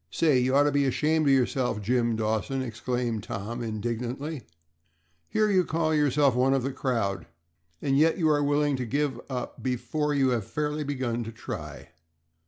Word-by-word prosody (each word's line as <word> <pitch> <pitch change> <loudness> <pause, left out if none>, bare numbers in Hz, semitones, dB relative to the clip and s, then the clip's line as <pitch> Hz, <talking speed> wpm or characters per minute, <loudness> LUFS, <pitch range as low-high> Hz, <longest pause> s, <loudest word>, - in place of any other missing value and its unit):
"Say, 145 - +3
you 130 +2 +1
ought 145 - +6
to 145 - +2
be 140 0 +2
ashamed 155 +3 +1
of 140 - +5
yourself, 125 -3 +1
Jim 120 +2 +1
Dawson," 110 +5 -1
exclaimed 120 -1 -2
Tom, 115 +1 -5
indignantly, 120 +6 -3 0.9
"here 215 0 +2
you 185 -2 +4
call 160 -1 0
yourself 145 -2 +3
one 130 +2 +3
of 135 - 0
the 135 +1 -2
crowd, 110 -9 -1 0.6
and 135 -1 +1
yet 160 +3 +4
you 165 -4 +2
are 145 -1 +3
willing 145 0 +2
to 125 - -3
give 145 +3 -1
up 125 -2 -5
before 130 +4 -1
you 135 -2 +3
have 120 -5 0
fairly 150 0 -2
begun 130 -4 -2
to 115 - -6
try. 115 - -7
130 Hz, 175 wpm, -27 LUFS, 120-145 Hz, 0.9 s, ought